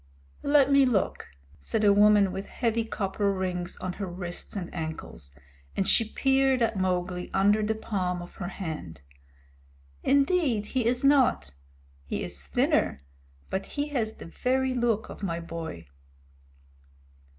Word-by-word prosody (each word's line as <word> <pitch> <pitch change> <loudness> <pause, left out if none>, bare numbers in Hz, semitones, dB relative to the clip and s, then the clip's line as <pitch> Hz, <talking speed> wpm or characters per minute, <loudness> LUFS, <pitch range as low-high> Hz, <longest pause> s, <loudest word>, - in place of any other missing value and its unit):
"Let 285 -1 +4
me 275 0 +6
look," 240 -7 0 0.3
said 210 - -1
a 205 -1 +6
woman 205 -1 +5
with 195 - -5
heavy 230 -2 -1
copper 200 -1 -1
rings 180 -2 -3
on 185 - -4
her 195 - -2
wrists 175 +1 -5
and 180 -4 -5
ankles, 160 - -6 0.5
and 195 - +1
she 230 - +4
peered 270 -1 +2
at 225 -1 +1
Mowgli 180 -1 -1
under 205 +2 +4
the 215 +1 0
palm 185 -5 -2
of 175 0 -10
her 175 - -4
hand. 155 - -6 1.0
"Indeed 275 - +2
he 245 +1 -1
is 245 +2 +1
not. 265 - +3 0.5
He - - -3
is - - -3
thinner, 70 - +1 0.5
but 190 - -2
he 290 +1 0
has 230 -6 -1
the - - -10
very 260 +8 0
look 235 -3 0
of - - -9
my 170 -4 -2
boy." 165 - -6
205 Hz, 145 wpm, -27 LUFS, 180-245 Hz, 1.0 s, me